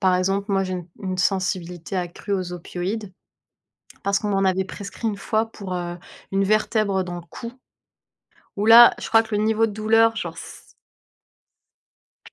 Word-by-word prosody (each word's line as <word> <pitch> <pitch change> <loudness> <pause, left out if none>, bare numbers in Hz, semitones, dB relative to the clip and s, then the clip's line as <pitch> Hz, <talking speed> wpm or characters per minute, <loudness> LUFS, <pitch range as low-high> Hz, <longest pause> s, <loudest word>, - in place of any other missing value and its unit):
par 185 -1 +3
exemple, 195 +3 -1
moi 195 -1 +2
j'ai 185 - -4
une 180 -1 -5
une 185 -1 -3
sensibilité 180 -2 -1
accrue 180 +2 -4
aux 185 -2 -2
opioïdes 185 +4 -5 0.9
parce 200 0 +1
qu'on 210 - -3
m'en 195 -1 +1
avait 190 0 +2
prescrit 200 +3 -6
une 205 -2 -2
fois 220 +2 0
pour, 190 -3 -7
heu, 175 -1 -4 0.3
une 195 0 +2
vertèbre 210 -2 +1
dans 175 -1 -6
le 175 - -6
cou, 235 0 -7 1.0
où 205 +1 -1
là, 235 +1 +9
je - - -5
crois 225 0 +6
que 225 -1 -4
le 205 - +1
niveau 220 +1 +2
de 210 - -7
douleur, 225 +1 +3
genre - - -5
c - - -7 1.8
c - - -16
195 Hz, 175 wpm, -23 LUFS, 185-215 Hz, 1.8 s, là